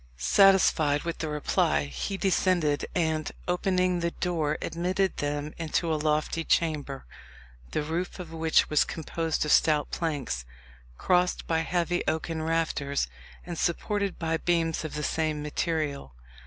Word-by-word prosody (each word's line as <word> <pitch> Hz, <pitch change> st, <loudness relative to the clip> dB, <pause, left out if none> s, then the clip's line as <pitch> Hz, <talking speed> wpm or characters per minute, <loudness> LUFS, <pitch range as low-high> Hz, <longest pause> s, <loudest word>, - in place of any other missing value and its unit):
Satisfied 155 Hz, -, +4 dB
with 170 Hz, 0 st, -4 dB
the 160 Hz, -, -2 dB
reply, 110 Hz, -, +1 dB
he 70 Hz, -, -4 dB
descended, 180 Hz, -6 st, +1 dB
and, 160 Hz, -3 st, 0 dB, 0.2 s
opening 180 Hz, 0 st, +1 dB
the 170 Hz, 0 st, 0 dB
door, 165 Hz, -4 st, -1 dB
admitted 180 Hz, +3 st, -1 dB
them 145 Hz, +1 st, -2 dB
into 165 Hz, 0 st, 0 dB
a -, -, +2 dB
lofty 155 Hz, +2 st, 0 dB
chamber, 150 Hz, -5 st, 0 dB, 0.6 s
the 150 Hz, -, -1 dB
roof 165 Hz, +4 st, -3 dB
of 175 Hz, -3 st, -8 dB
which 160 Hz, 0 st, +3 dB
was 150 Hz, -, +3 dB
composed 160 Hz, 0 st, -2 dB
of 150 Hz, -, 0 dB
stout 150 Hz, -2 st, +3 dB
planks, 145 Hz, -, -2 dB, 0.5 s
crossed 180 Hz, 0 st, +1 dB
by 165 Hz, -1 st, +1 dB
heavy 175 Hz, +1 st, 0 dB
oaken 160 Hz, 0 st, -1 dB
rafters, 160 Hz, -3 st, 0 dB, 0.4 s
and 175 Hz, -1 st, -5 dB
supported 200 Hz, +3 st, -1 dB
by 165 Hz, -1 st, 0 dB
beams 165 Hz, -1 st, 0 dB
of 155 Hz, -, -5 dB
the 150 Hz, -, -3 dB
same 155 Hz, -1 st, -1 dB
material. 150 Hz, -, -2 dB
160 Hz, 140 wpm, -28 LUFS, 150-175 Hz, 0.6 s, Satisfied